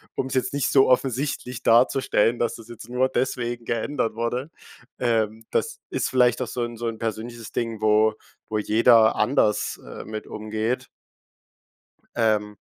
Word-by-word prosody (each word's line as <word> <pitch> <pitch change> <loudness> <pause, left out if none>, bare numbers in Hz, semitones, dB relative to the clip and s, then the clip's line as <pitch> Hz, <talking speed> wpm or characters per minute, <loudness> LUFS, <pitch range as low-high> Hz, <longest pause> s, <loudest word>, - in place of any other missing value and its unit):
um's 130 - -3
jetzt 130 +1 0
nicht 140 -1 0
so 135 -2 +5
offensichtlich 130 -1 0
darzustellen, 120 -1 +3
dass 115 -1 0
das 115 - -12
jetzt 120 0 -11
nur 125 +1 +2
deswegen 120 -1 -2
geändert 115 0 -1
wurde. 120 +5 -2 0.5
Ähm, 110 -2 0
das 465 +1 -1
ist - - -1
vielleicht 125 -1 +3
auch 125 - -2
so 125 - -4
'n 120 0 -5
so 120 +1 -3
'n 115 -1 -3
persönliches 115 +1 -5
Ding, 115 -2 -2
wo 110 0 +4 0.4
wo 110 - -1
jeder 110 +1 +5
anders, 105 -2 +1
äh, - - -9
mit 110 0 -7
umgeht. 110 +4 -3 1.3
Ähm. 105 -2 +1
115 Hz, 150 wpm, -24 LUFS, 110-125 Hz, 1.3 s, so